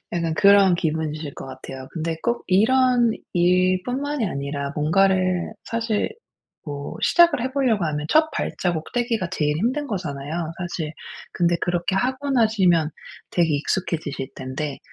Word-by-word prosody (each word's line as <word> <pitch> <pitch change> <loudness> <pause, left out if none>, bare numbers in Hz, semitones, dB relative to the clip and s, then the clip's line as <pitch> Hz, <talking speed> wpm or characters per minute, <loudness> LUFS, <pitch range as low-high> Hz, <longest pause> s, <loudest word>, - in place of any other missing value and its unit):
약간 165 -2 -1
그런 200 0 +6
기분이실 155 -2 -2
것 - - -8
같아요. 130 0 -9
근데 165 -1 -3
꼭 235 0 -1
이런 240 +4 +4 0.2
일 180 +1 +3
뿐만이 275 0 -2
아니라 140 -3 -3
뭔가를 185 +4 +2
사실 230 -2 -1 0.5
뭐 145 -1 -6
시작을 340 -6 +5
해 260 - -1
보려고 240 -9 +1
하면 150 -1 -2
첫 315 0 +4
발자국 175 - -2
떼기가 235 -6 0
제일 150 -5 0
힘든 260 - 0
거잖아요, 145 - -4 0.3
사실. 175 -3 -4 0.4
근데 175 0 +2
그렇게 175 +1 0
하고 260 +5 -1
나시면 195 - +3 0.4
되게 170 -2 +2
익숙해지실 145 -3 -2
텐데 135 +2 -4
180 Hz, 300 characters per minute, -23 LUFS, 155-230 Hz, 0.5 s, 그런